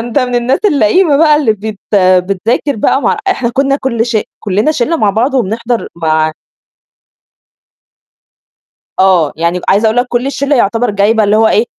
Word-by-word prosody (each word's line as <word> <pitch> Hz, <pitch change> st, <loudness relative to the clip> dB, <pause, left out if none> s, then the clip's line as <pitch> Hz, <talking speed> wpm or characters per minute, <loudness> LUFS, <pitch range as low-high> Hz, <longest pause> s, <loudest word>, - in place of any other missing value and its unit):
أنت 240 Hz, +4 st, -2 dB
من 250 Hz, -2 st, -2 dB
الناس 245 Hz, +2 st, 0 dB
اللئيمة 290 Hz, -, +2 dB
بقى 305 Hz, 0 st, +4 dB
اللي 280 Hz, -7 st, +1 dB
بت 215 Hz, 0 st, -7 dB, 0.2 s
آآ، 185 Hz, -2 st, +4 dB
بتذاكر 215 Hz, +9 st, -2 dB
بقى 270 Hz, +6 st, 0 dB
مع" 455 Hz, -, +1 dB
إحنا 265 Hz, -11 st, -1 dB
كنا 275 Hz, +2 st, 0 dB
كُلّ 235 Hz, -4 st, -2 dB
ش 235 Hz, -2 st, -1 dB, 0.2 s
كلّنا 210 Hz, +8 st, 0 dB
شلّة 310 Hz, +4 st, -1 dB
مع 210 Hz, -9 st, +1 dB
بعض 240 Hz, +7 st, -1 dB
وبنحضر 230 Hz, 0 st, -2 dB
مع 155 Hz, -1 st, 0 dB, 2.7 s
آه، 185 Hz, -5 st, +3 dB
يعني 170 Hz, +2 st, -1 dB
عايزة 205 Hz, +4 st, +2 dB
أقول 220 Hz, +2 st, +1 dB
لك 245 Hz, -, +2 dB
كُلّ 245 Hz, +1 st, -1 dB
الشلّة 280 Hz, +1 st, -1 dB
يعتبر 230 Hz, 0 st, 0 dB
جايبة 210 Hz, +2 st, +1 dB
اللي 205 Hz, +1 st, +2 dB
هو 220 Hz, 0 st, +3 dB
إيه 220 Hz, +1 st, +1 dB
225 Hz, 170 wpm, -12 LUFS, 200-265 Hz, 2.7 s, بقى